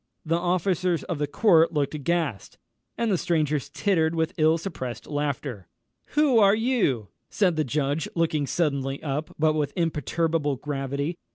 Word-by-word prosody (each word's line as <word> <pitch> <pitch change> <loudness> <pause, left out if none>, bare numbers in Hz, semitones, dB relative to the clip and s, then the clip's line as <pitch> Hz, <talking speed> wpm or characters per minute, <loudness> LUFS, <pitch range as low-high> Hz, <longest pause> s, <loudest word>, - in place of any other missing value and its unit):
The 165 +1 +1
officers 180 -1 0
of 170 -5 -4
the 145 - 0
court 165 -1 +4
looked 145 -1 0
aghast, 150 - -2 0.4
and 230 -2 0
the 185 - +1
strangers 155 -5 0
tittered 170 -5 +1
with 160 -1 0
ill 155 +1 +4
suppressed 150 -9 -6
laughter. 140 - -3 0.5
"Who 285 -6 +5
are 200 -1 +6
you?" 215 - 0 0.2
said 185 -5 +2
the 155 - +1
judge, 145 +2 -1
looking 160 -4 +1
suddenly 140 -5 -1
up, 150 +1 -3
but 155 0 +3
with 150 -2 -1
imperturbable 160 -2 0
gravity. 140 +3 -3
155 Hz, 150 wpm, -25 LUFS, 145-175 Hz, 0.5 s, are